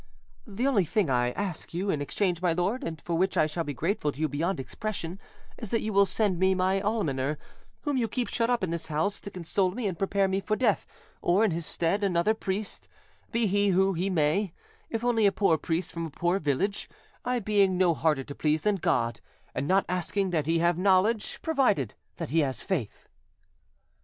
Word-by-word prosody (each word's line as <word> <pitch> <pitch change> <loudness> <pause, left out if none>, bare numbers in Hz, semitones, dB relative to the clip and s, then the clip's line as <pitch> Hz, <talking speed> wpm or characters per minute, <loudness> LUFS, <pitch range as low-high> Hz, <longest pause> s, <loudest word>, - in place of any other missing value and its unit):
The 220 +4 -2
only 250 -9 +3
thing 175 - 0
I 125 -1 +2
ask 185 -4 -5
you 195 +3 0
in 145 - -1
exchange, 175 +3 -1
my 175 -2 +2
lord, 185 +9 -1
and 160 -1 -4
for 170 - -4
which 190 +3 +1
I - - +5
shall 155 +2 -2
be 145 -3 -5
grateful 160 - 0
to 140 - -13
you 155 - +2
beyond 160 +6 -1
expression, 185 +4 -5 0.4
is 225 - -6
that 230 - 0
you 215 0 -2
will 200 0 +5
send 190 -2 0
me 190 0 +3
my 190 +1 +1
almoner, 150 -10 0 0.4
whom 290 -3 -1
you 235 -3 +1
keep 245 +1 -2
shut 230 0 0
up 245 -4 +1
in 180 - -1
this 170 -1 -4
house, 160 +7 -1
to - - -7
console 185 +1 0
me 220 +5 -4
and 185 -5 -2
prepare 195 0 +2
me 190 0 0
for 215 +2 -1
death, 255 - +1 0.3
or, 190 +6 +3
in 210 - +1
his 165 0 -3
stead, 185 +5 0
another 190 +2 +2
priest, 200 -1 -4 0.4
be 230 0 +1
he 205 0 +2
who 190 0 +3
he 180 +3 -1
may; 170 +2 +1 0.4
if 225 0 -3
only 225 -4 +4
a - - +4
poor 190 -4 +3
priest 165 +2 -2
from 165 -1 -4
a - - -9
poor 175 +5 0
village, 165 +7 -1 0.3
I 250 0 0
being 200 -4 +2
no 180 -2 +4
harder 155 -4 +1
to 140 - -8
please 155 +1 0
than 210 -1 +2
God, 115 - 0 0.3
and 140 - -2
not 190 +3 +3
asking 185 +2 -1
that 155 -4 0
he 165 +1 +3
have 170 +1 +2
knowledge, 200 +3 +2
provided 255 - +2 0.2
that - - -5
he 165 - +3
has 135 -4 -1
faith." 150 - -3
185 Hz, 210 wpm, -28 LUFS, 165-205 Hz, 0.4 s, I